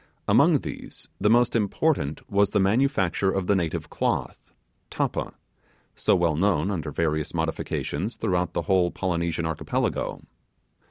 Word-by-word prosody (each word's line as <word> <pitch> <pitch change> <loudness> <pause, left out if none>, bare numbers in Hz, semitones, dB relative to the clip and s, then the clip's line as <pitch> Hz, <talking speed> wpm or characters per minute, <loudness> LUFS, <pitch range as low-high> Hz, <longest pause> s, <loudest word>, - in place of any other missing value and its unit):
Among - - +5
these - - -8
the 105 - +2
most 120 +1 +4
important 105 - 0
was 100 0 +2
the 105 - +1
manufacture 100 - +2
of 95 -1 -1
the 100 - +3
native 85 -4 -2
cloth, - - -2 0.4
'tappa', - - -2 0.6
so - - +2
well 85 -3 +2
known, 95 +1 +1
under 80 -5 -3
various 75 0 -1
modifications, 80 +4 -2
throughout 90 -4 -1
the - - -1
whole 95 -3 +2
Polynesian 85 -2 -2
Archipelago. 80 -2 -2
95 Hz, 130 wpm, -25 LUFS, 80-100 Hz, 0.6 s, Among